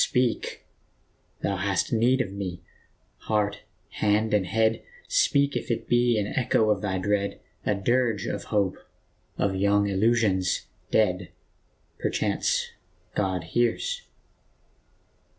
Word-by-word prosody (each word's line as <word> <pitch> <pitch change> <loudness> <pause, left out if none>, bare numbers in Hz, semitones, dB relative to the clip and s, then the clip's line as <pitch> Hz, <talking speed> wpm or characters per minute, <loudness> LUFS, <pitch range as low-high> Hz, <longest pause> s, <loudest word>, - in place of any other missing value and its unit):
Speak! 125 -2 0 0.8
thou 100 - 0
hast 100 +4 0
need 125 +3 +3
of 110 - -3
me, 95 -3 -5 0.7
heart, 105 -1 +1 0.4
hand 105 +1 +2
and 100 -3 +2
head, 110 +3 +2 0.3
Speak, 140 - +3
if - - -3
it 115 - -2
be 120 -1 +3
an 105 - +1
echo 110 -1 +2
of 100 -2 0
thy 95 -2 -1
dread, 100 +1 -1 0.3
A 105 - +3
dirge 115 0 +1
of - - -3
hope, 100 -3 0 0.6
of 95 -1 +1
young 100 +1 +3
illusions 100 -2 +2 0.2
dead 90 -4 +2 0.7
Perchance - - 0 0.4
God 95 -3 -1
hears 120 - 0
105 Hz, 115 wpm, -26 LUFS, 95-115 Hz, 0.8 s, need